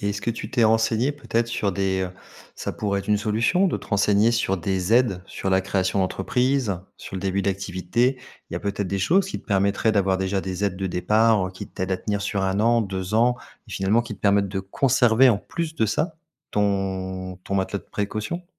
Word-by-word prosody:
Et 100 - -1
est-ce 100 0 -4
que 100 - -1
tu 115 - -6
t'es 120 -3 +3
renseigné 115 +4 +2
peut-être 120 -5 -1
sur 115 -4 -1
des, 95 0 0
heu, 90 - -3 0.5
ça - - -4
pourrait 100 -2 -1
être 100 - -7
une 105 - +4
solution 115 - +2
de - - -1
te - - -12
renseigner 105 +2 +3
sur 105 -4 +1
des 95 +2 -1
aides 115 -7 +3
sur 95 - -4
la 95 0 +4
création 95 0 0
d'entreprise, 110 +3 0 0.2
sur - - -9
le - - -4
début 95 +1 0
d'activité, 100 +6 0 0.3
il - - -5
y - - -1
a - - -4
peut-être 100 -1 -2
des 100 - -1
choses 180 - +3
qui - - -5
te - - -28
permettraient 100 +2 +2
d'avoir 95 -2 +2
déjà 95 +1 0
des 95 +1 -3
aides 95 -2 -1
de 95 +1 -2
départ, 105 +2 +3
heu, - - -6
qui 95 - -8
t'aident 95 +1 -3
à - - +1
tenir 100 +1 -3
sur 100 -1 -1
1 95 +1 0
an, 115 +1 +4
2 95 -1 -3
ans 120 +2 +4 0.3
et - - -13
finalement 100 +5 +2
qui 115 -2 -7
te - - -29
permettent 100 -1 +3
de 95 0 -3
conserver, 120 +4 +4
en 110 -5 +3
plus 160 +6 -5
de 110 - +2
ça, 155 - -1 0.3
ton 95 -2 -1
ton 100 - -3
matelas 95 +1 0
de - - -17
précaution? 110 - -3
100 Hz, 225 wpm, -24 LUFS, 95-115 Hz, 0.5 s, une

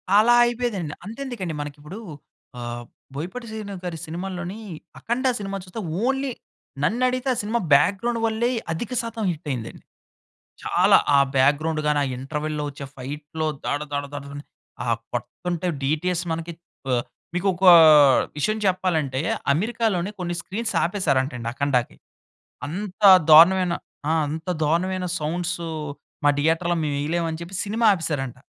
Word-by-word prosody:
అలా 225 +3 +6
అయిపోయేదండి. 235 -10 -1
అంతెందుకండి 225 - -5
మనకి 145 0 -7
ఇప్పుడు 185 +9 -9 0.6
ఆహ్, 120 0 -5 0.3
బోయపాటి 185 - -5
శ్రీను 215 -2 -6
గారి 175 -2 -4
సినిమాల్లోని 180 +4 -5 0.4
'అఖండ' 255 +3 -1
సినిమా 195 -1 -4
చూస్తే 190 +4 -7 0.2
ఓన్లీ 270 +1 0 0.5
నన్ను 240 +9 +1
అడిగితే 255 +1 -1
ఆ - - -4
సినిమా 220 +3 -1
బ్యాక్‌గ్రౌండ్ 205 +10 +3
వల్లే 225 +2 +1 0.2
అధిక 215 +9 -4
శాతం 230 -1 -5
హిట్ 155 -1 -8
అయిందండి. 115 -3 -6 0.8
చాలా - - +4 0.2
ఆ - - +6 0.2
బ్యాక్‌గ్రౌండ్ 150 +4 +2
గాని, 150 0 +2
ఆ - - -2
ఇంటర్వల్‌లో 150 +2 -3
వచ్చే 140 0 -9
ఫైట్‌లో 150 +4 -5 0.2
దాడ 145 - 0
దాడ 145 0 -1
దాడ 145 -1 -6 0.6
ఆ - - -6 0.3
కొడతంటే 170 +9 -3 0.2
డీటీఎస్ 175 +5 0
మనకి 165 +1 -4 0.4
ఆహ్, 120 -1 +2 0.3
మీకు 180 +3 -1
ఒక 185 +2 -3 0.7
విషయం 215 +9 0
చెప్పాలంటే, 165 -8 0 0.3
అమెరికాలోని 205 0 0
కొన్ని 175 -1 -2
స్క్రీన్స్ 225 +4 -4
ఆపేసారంట 155 -7 0
అండి 115 -1 -4
'అఖండ'కి. 130 -3 0 0.7
అంత 190 +4 -6 0.3
దారుణమైన 175 +3 +7 0.4
ఆ! - - +2 0.2
అంత 160 +4 -5
దారుణమైన 180 +4 0
సౌండ్స్ 175 +4 -2 0.7
మా - - +7
థియేటర్‌లో 165 +3 +1
మేము 145 -1 -1
వేయలేమని 165 +2 -1
చెప్పి 175 +3 -7
సినిమా 225 +3 0
ఆపేసారంట. 145 -8 -3
175 Hz, 135 wpm, -23 LUFS, 150-205 Hz, 0.8 s, దారుణమైన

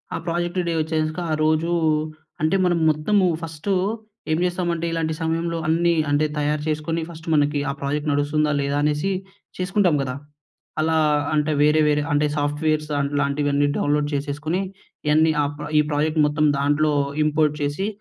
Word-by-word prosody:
ఆ - - -1
project 175 +2 -1
day 170 - 0
వచ్చేసాక 155 +1 -1
ఆ - - +2
రోజూ 155 +2 +1 0.7
అంటే 155 +5 +2
మనం 175 -1 +2
మొత్తము 185 +6 +2 0.2
ఫస్టు 165 +3 -4 0.6
ఏం 155 - +2
చేస్తామంటే 175 -2 -1
ఇలాంటి 165 -1 -1
సమయంలో 165 +1 -1
అన్నీ 170 +2 +3 0.2
అంటే 145 +1 +2
తయారు 150 0 0
చేసుకొని 155 +2 -1
ఫస్ట్ 165 -1 -11
మనకి 145 -1 +2
ఆ - - +1
ప్రాజెక్ట్ 145 +2 -1
నడుస్తుందా 150 +1 +1
లేదా 140 +1 -1
అనేసి 150 +5 0 0.5
చేసుకుంటాం 185 -2 +2
కదా! 130 -2 -3 0.6
అలా 160 +1 +2 0.4
అంటే 150 0 +1
వేరే 150 +1 +4
వేరే 150 0 +2
అంటే 145 +1 +2
సాఫ్ట్‌వేర్స్ 150 +1 0 0.3
లాంటివన్నీ 145 0 +1
డౌన్‌లోడ్ 145 0 +1
చేసేసుకొని 145 +5 -2 0.5
ఇయన్నీ 155 +2 +4
అ - - +1 0.3
ఈ - - +6
ప్రాజెక్ట్ 155 +2 0
మొత్తం 150 +1 +1
దాంట్లో 145 +2 +2 0.3
ఇంపోర్ట్ 150 0 +2
చేసి 145 +8 -1
155 Hz, 145 wpm, -22 LUFS, 145-165 Hz, 0.7 s, ఈ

